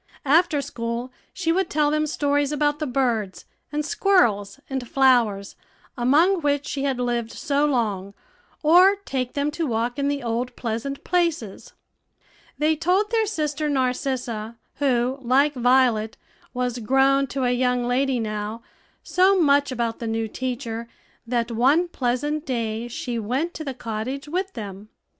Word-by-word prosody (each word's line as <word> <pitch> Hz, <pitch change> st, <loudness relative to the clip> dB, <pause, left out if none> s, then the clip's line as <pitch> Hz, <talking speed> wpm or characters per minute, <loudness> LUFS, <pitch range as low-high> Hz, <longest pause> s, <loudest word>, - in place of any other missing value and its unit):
After 305 Hz, 0 st, +3 dB
school 240 Hz, -1 st, -4 dB, 0.2 s
she 335 Hz, -3 st, -1 dB
would 375 Hz, +1 st, +1 dB
tell 295 Hz, -1 st, +2 dB
them 305 Hz, 0 st, +1 dB
stories 290 Hz, -1 st, 0 dB
about 295 Hz, 0 st, 0 dB
the 305 Hz, -, -2 dB
birds, 235 Hz, -7 st, -1 dB, 0.3 s
and 300 Hz, 0 st, -2 dB
squirrels, 225 Hz, -, +2 dB
and 265 Hz, -3 st, -4 dB
flowers, 235 Hz, -7 st, +2 dB, 0.4 s
among 315 Hz, +10 st, +3 dB
which 285 Hz, -1 st, 0 dB
she 275 Hz, -, -3 dB
had 270 Hz, -2 st, 0 dB
lived 240 Hz, -2 st, -1 dB
so 290 Hz, -1 st, 0 dB
long, 205 Hz, -7 st, -1 dB, 0.5 s
or 360 Hz, +6 st, +6 dB
take 255 Hz, -2 st, -2 dB
them 285 Hz, +1 st, 0 dB
to 325 Hz, +1 st, -2 dB
walk 235 Hz, +3 st, -1 dB
in 280 Hz, -, +1 dB
the 285 Hz, -2 st, -1 dB
old 240 Hz, +1 st, -2 dB
pleasant 240 Hz, +4 st, -4 dB
places. 335 Hz, -, -1 dB, 0.8 s
They 310 Hz, +1 st, +2 dB
told 365 Hz, +7 st, +1 dB
their 445 Hz, -2 st, +2 dB
sister 305 Hz, -5 st, -2 dB
Narcissa, 250 Hz, -4 st, -2 dB, 0.2 s
who, 260 Hz, -1 st, +1 dB
like 270 Hz, +4 st, +3 dB
Violet, 245 Hz, -4 st, +2 dB, 0.3 s
was 250 Hz, -1 st, -2 dB
grown 270 Hz, +4 st, +3 dB
to 265 Hz, +1 st, -3 dB
a 245 Hz, -, +2 dB
young 250 Hz, 0 st, +1 dB
lady 260 Hz, +1 st, +1 dB
now, 215 Hz, +1 st, -4 dB, 0.4 s
so 370 Hz, +4 st, +3 dB
much 285 Hz, -3 st, +3 dB
about 235 Hz, -2 st, -2 dB
the 230 Hz, -, -4 dB
new 225 Hz, 0 st, -1 dB
teacher, 235 Hz, -1 st, -4 dB, 0.4 s
that 235 Hz, 0 st, -1 dB
one 275 Hz, +10 st, +3 dB
pleasant 290 Hz, +1 st, -1 dB
day 230 Hz, -4 st, -2 dB
she 240 Hz, 0 st, -4 dB
went 260 Hz, +11 st, -2 dB
to 315 Hz, -, -6 dB
the 270 Hz, -4 st, -5 dB
cottage 240 Hz, +5 st, -5 dB
with 375 Hz, +5 st, -2 dB
them. 205 Hz, -1 st, -8 dB
260 Hz, 150 wpm, -23 LUFS, 235-295 Hz, 0.8 s, or